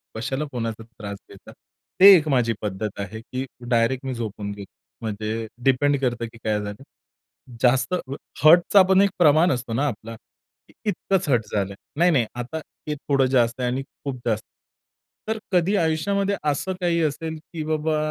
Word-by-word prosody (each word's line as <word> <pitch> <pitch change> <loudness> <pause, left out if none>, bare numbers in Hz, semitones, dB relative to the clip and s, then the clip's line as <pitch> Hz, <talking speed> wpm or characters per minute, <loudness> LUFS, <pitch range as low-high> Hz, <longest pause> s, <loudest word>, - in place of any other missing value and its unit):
कशाला 135 +6 -2
कोणाचा 115 -2 -4
त्रास 105 -3 -8
घेता. - - -14 0.5
ते 195 +1 +11
एक 155 -2 +2
माझी 120 -4 +2
पद्धत 105 0 -4
आहे, 110 +2 -5
की 130 +3 -5 0.2
डायरेक्ट 120 +3 +1
मी 130 - -2
झोपून 105 -3 -5
घेतो 100 -1 -9 0.3
म्हणजे 110 +1 -3 0.2
डिपेंड 140 +2 +3
करतं 120 -2 -1
की 115 0 -12
काय 105 -1 0
झालं. 105 +6 -7 0.8
जास्त 125 +5 +3
अ, 140 -7 -3 0.3
हर्टचा 175 +5 +7
पण 190 +1 +6
एक 200 - +4
प्रमाण 160 +1 +5
असतो 120 -2 -3
ना 145 +5 +1
आपला. 115 -1 -6 0.7
इतकंच 195 -3 0
हर्ट 120 -4 +3
झालं, 100 -1 -1 0.2
नाही-नाही 165 -9 +4
आता 125 +6 -5 0.3
हे 150 - -1
थोडं 140 -1 +1
जास्त 120 -1 +2
आहे 125 - +1
आणि 130 +2 -2
खूप 140 -1 -7
जास्त. 110 -2 0 0.8
तर 220 0 -1
कधी 185 +3 +2
आयुष्यामध्ये 195 +5 +1 0.2
असं 185 +7 -2
काही 170 -1 +1
असेल 160 +2 -2 0.2
की 160 -2 -3
बाबा, 155 0 0
130 Hz, 160 wpm, -23 LUFS, 115-160 Hz, 0.8 s, ते